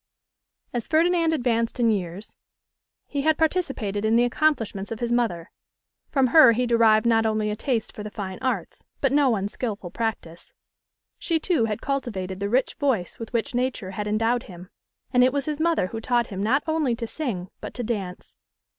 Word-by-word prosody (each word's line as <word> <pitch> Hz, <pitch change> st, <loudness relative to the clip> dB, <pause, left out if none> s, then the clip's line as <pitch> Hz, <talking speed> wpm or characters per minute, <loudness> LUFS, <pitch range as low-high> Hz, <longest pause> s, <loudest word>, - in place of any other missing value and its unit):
As 240 Hz, -2 st, -3 dB
Ferdinand 335 Hz, +1 st, +3 dB
advanced 240 Hz, -5 st, 0 dB
in 230 Hz, -2 st, +4 dB
years, 190 Hz, 0 st, -4 dB, 0.7 s
he 285 Hz, -, -3 dB
had 315 Hz, +1 st, +2 dB
participated 270 Hz, -, -1 dB
in 220 Hz, +1 st, +3 dB
the 240 Hz, -, +5 dB
accomplishments 235 Hz, -7 st, 0 dB
of 225 Hz, -, -4 dB
his 240 Hz, -1 st, -2 dB
mother; 215 Hz, -8 st, 0 dB, 0.6 s
from 270 Hz, -2 st, +3 dB
her 285 Hz, -8 st, +9 dB
he 250 Hz, +2 st, 0 dB
derived 230 Hz, -2 st, +4 dB
not 225 Hz, -1 st, +3 dB
only 215 Hz, -1 st, 0 dB
a -, -, -2 dB
taste 230 Hz, -1 st, -2 dB
for -, -, -8 dB
the 210 Hz, -, -5 dB
fine 190 Hz, -3 st, -6 dB
arts, 260 Hz, -, -3 dB, 0.2 s
but -, -, +1 dB
no 275 Hz, -4 st, +4 dB
unskilful 200 Hz, -1 st, -4 dB
practice. 205 Hz, -7 st, -4 dB, 0.7 s
She, 330 Hz, -2 st, 0 dB
too, 315 Hz, -8 st, +1 dB
had 215 Hz, 0 st, -3 dB
cultivated 200 Hz, -9 st, -3 dB
the 200 Hz, 0 st, -2 dB
rich 255 Hz, +4 st, +1 dB
voice 250 Hz, -, 0 dB
with 230 Hz, -, -7 dB
which 235 Hz, 0 st, -1 dB
Nature 245 Hz, -6 st, -2 dB
had 210 Hz, +2 st, -4 dB
endowed 225 Hz, +3 st, +1 dB
him, 180 Hz, +1 st, -11 dB, 0.4 s
and 250 Hz, 0 st, +6 dB
it 255 Hz, -, +4 dB
was 280 Hz, 0 st, -2 dB
his 300 Hz, -1 st, -3 dB
mother 330 Hz, -, +2 dB
who 225 Hz, +4 st, -6 dB
taught 240 Hz, 0 st, +1 dB
him 190 Hz, -, -3 dB
not 255 Hz, +8 st, +2 dB
only 315 Hz, -7 st, +1 dB
to 230 Hz, 0 st, -4 dB
sing, 220 Hz, -, -4 dB
but -, -, -8 dB
to 245 Hz, -, -3 dB
dance. 200 Hz, -6 st, -5 dB
230 Hz, 185 wpm, -24 LUFS, 210-265 Hz, 0.7 s, her